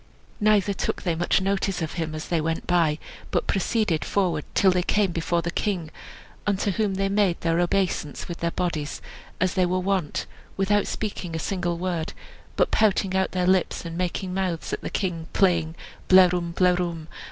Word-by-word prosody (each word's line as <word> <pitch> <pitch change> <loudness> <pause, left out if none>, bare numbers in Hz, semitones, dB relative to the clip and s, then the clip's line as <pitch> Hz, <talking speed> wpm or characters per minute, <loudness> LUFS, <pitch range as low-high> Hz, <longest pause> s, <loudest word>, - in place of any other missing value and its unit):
Neither 210 -2 +3
took - - -2
they 175 - +1
much 170 +3 +1
notice 195 0 0
of 160 -2 -3
him 160 -3 -3
as 155 - -6
they 170 -2 +1
went 160 +1 -2
by 165 -4 +2 0.3
but - - 0
proceeded 195 -4 +1
forward 175 -7 0
till 190 - +5
they 180 0 +2
came 200 +1 +1
before 170 0 0
the 170 - -2
king, 175 -5 -2 0.6
unto 200 0 +1
whom 200 0 0
they 195 +1 +1
made 195 -3 +2
their 165 0 +1
obeisance 175 -4 0
with 170 - -6
their 170 - 0
bodies, 165 -4 -2 0.4
as 185 +1 +1
they 185 -2 +2
were 180 +1 0
wont, 185 -4 -1 0.3
without 205 +2 +2
speaking 190 -5 -4
a - - 0
single 175 0 -2
word, 175 -2 -2 0.4
but - - +2
pouting 200 -3 +2
out 190 0 +1
their 180 -1 +1
lips, 185 -1 +1
and 165 0 -5
making 180 +1 -2
mouths 185 -3 -2
at - - -2
the - - -4
king, 170 -5 -2
playing, 170 -4 +2 0.3
"Blerwm, 180 -2 +5
blerwm!" 175 -3 +1
180 Hz, 180 wpm, -25 LUFS, 170-195 Hz, 0.6 s, till